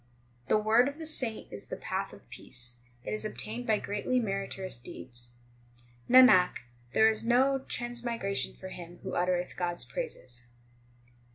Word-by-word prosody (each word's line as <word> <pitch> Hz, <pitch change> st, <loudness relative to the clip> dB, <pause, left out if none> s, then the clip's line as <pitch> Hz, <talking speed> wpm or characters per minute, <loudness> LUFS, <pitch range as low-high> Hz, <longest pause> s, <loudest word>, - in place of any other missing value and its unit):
The -, -, +4 dB
word 220 Hz, +4 st, +4 dB
of 285 Hz, +1 st, -4 dB
the 320 Hz, -, -6 dB
saint 255 Hz, -8 st, -3 dB
is 100 Hz, -, -7 dB
the -, -, -4 dB
path -, -, -3 dB
of -, -, -15 dB
peace; 120 Hz, 0 st, -4 dB, 0.3 s
it -, -, -4 dB
is 215 Hz, -, -1 dB
obtained 220 Hz, +3 st, -4 dB
by 215 Hz, -1 st, +4 dB
greatly 210 Hz, +6 st, 0 dB
meritorious 195 Hz, -3 st, -2 dB
deeds. 120 Hz, 0 st, -8 dB, 0.8 s
Nanak, 250 Hz, -8 st, +7 dB, 0.3 s
there 220 Hz, -, +6 dB
is 220 Hz, 0 st, +1 dB
no 260 Hz, +4 st, +4 dB
transmigration 235 Hz, -4 st, -2 dB
for 190 Hz, -, -8 dB
him 175 Hz, -1 st, -9 dB
who -, -, -4 dB
utter 180 Hz, 0 st, +2 dB
eth 175 Hz, 0 st, -5 dB
God 175 Hz, -1 st, -1 dB
s -, -, -3 dB
praises. 125 Hz, -, -4 dB
215 Hz, 160 wpm, -30 LUFS, 175-240 Hz, 0.8 s, Nanak